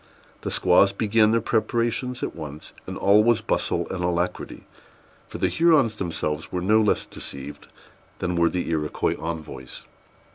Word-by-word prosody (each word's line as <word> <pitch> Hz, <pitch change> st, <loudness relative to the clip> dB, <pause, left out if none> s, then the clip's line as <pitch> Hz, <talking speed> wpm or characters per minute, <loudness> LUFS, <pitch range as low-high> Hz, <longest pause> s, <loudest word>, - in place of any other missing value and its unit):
The -, -, -3 dB
squaws 95 Hz, +2 st, +4 dB
began 105 Hz, +1 st, +3 dB
their 115 Hz, +1 st, +2 dB
preparations 120 Hz, +3 st, -1 dB
at -, -, -3 dB
once, 75 Hz, 0 st, -8 dB
and -, -, -5 dB
all 100 Hz, +2 st, +5 dB
was 115 Hz, -1 st, +3 dB
bustle -, -, -1 dB
and 90 Hz, -2 st, -3 dB
alacrity; 90 Hz, +1 st, -2 dB, 0.6 s
for -, -, -8 dB
the -, -, +1 dB
Hurons 150 Hz, -10 st, +3 dB
themselves 80 Hz, -5 st, -3 dB
were 90 Hz, -, -1 dB
no 110 Hz, +3 st, +4 dB
less 105 Hz, -, +1 dB
deceived 70 Hz, +1 st, -9 dB, 0.5 s
than 90 Hz, -, -2 dB
were 85 Hz, -1 st, +3 dB
the 90 Hz, -, -3 dB
Iroquois 75 Hz, -2 st, -1 dB
envoys. 80 Hz, -6 st, -6 dB
95 Hz, 150 wpm, -24 LUFS, 85-110 Hz, 0.6 s, all